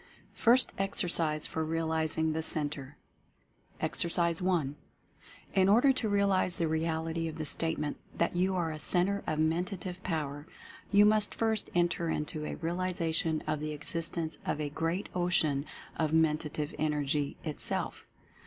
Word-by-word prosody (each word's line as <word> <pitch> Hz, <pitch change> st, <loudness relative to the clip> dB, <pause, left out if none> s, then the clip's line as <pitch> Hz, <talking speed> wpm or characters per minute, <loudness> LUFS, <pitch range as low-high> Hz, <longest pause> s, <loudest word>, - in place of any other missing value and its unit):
FIRST 245 Hz, +2 st, +4 dB
EXERCISE 170 Hz, -5 st, +1 dB
FOR 160 Hz, -, -3 dB
REALIZING 160 Hz, 0 st, +1 dB
THE 160 Hz, -, -1 dB
CENTRE. 145 Hz, -3 st, -1 dB, 0.8 s
Exercise 170 Hz, 0 st, +1 dB
I. 180 Hz, -6 st, +1 dB, 0.8 s
In 190 Hz, -1 st, +4 dB
order 245 Hz, +6 st, +6 dB
to 240 Hz, -4 st, -2 dB
realize 200 Hz, -3 st, +2 dB
the 165 Hz, -, +1 dB
reality 160 Hz, +1 st, -1 dB
of 160 Hz, 0 st, -6 dB
the 155 Hz, -, -3 dB
statement 150 Hz, -1 st, 0 dB, 0.2 s
that 170 Hz, -, +1 dB
you 185 Hz, +2 st, +1 dB
are 170 Hz, -3 st, 0 dB
a 155 Hz, -, -6 dB
Centre 195 Hz, +5 st, +1 dB
of 155 Hz, -, -1 dB
Mentative 180 Hz, +3 st, -1 dB
Power 150 Hz, -4 st, -3 dB, 0.4 s
you 205 Hz, 0 st, +7 dB
must 210 Hz, 0 st, +3 dB
first 220 Hz, -2 st, +1 dB
enter 175 Hz, -1 st, +1 dB
into 150 Hz, 0 st, -2 dB
a -, -, -4 dB
realization 165 Hz, -2 st, -1 dB
of 155 Hz, -1 st, -1 dB
the 155 Hz, 0 st, -3 dB
existence 160 Hz, +2 st, -3 dB
of -, -, -2 dB
a 150 Hz, -1 st, -2 dB
Great 165 Hz, +6 st, -2 dB
Ocean 160 Hz, -5 st, +1 dB, 0.3 s
of 155 Hz, -1 st, 0 dB
Mentative 150 Hz, -2 st, +1 dB
Energy 150 Hz, -1 st, 0 dB
itself. 155 Hz, -3 st, -3 dB
165 Hz, 140 wpm, -31 LUFS, 155-180 Hz, 0.8 s, you